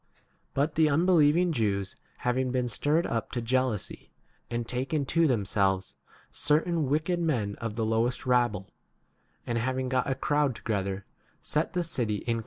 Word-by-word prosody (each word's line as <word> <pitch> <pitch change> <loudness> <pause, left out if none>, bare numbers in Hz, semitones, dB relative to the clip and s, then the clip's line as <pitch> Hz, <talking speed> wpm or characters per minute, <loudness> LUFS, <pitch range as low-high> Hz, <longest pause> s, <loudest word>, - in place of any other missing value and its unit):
But 145 +3 +1
the 155 0 +4
unbelieving 170 +1 +4
Jews 100 -8 -1 0.3
having 130 +1 +1
been 125 -1 0
stirred 145 +8 +1
up 115 -1 -2
to 120 - -1
jea 120 +3 +2
lousy, 125 -7 -4 0.4
and 120 0 -2
a - - -20
taken 135 +4 -1
to 165 +4 +3 0.2
[themselves] 95 -1 0 0.4
certain 155 0 +1
wicked 160 +5 +1
men 125 -12 0
of 115 -2 -3
the 115 -1 -1
lowest 115 +4 0
rabble, 120 -6 +1 0.7
and 120 -1 -1
having 130 +2 -1
got 130 +1 0
a 135 - +1
crowd 145 -2 +1
* - - -36
See 110 - 0
note 100 - -4
to 180 - +1
verse 170 -1 -2
20. 110 -4 -1
130 Hz, 165 wpm, -28 LUFS, 115-150 Hz, 0.7 s, the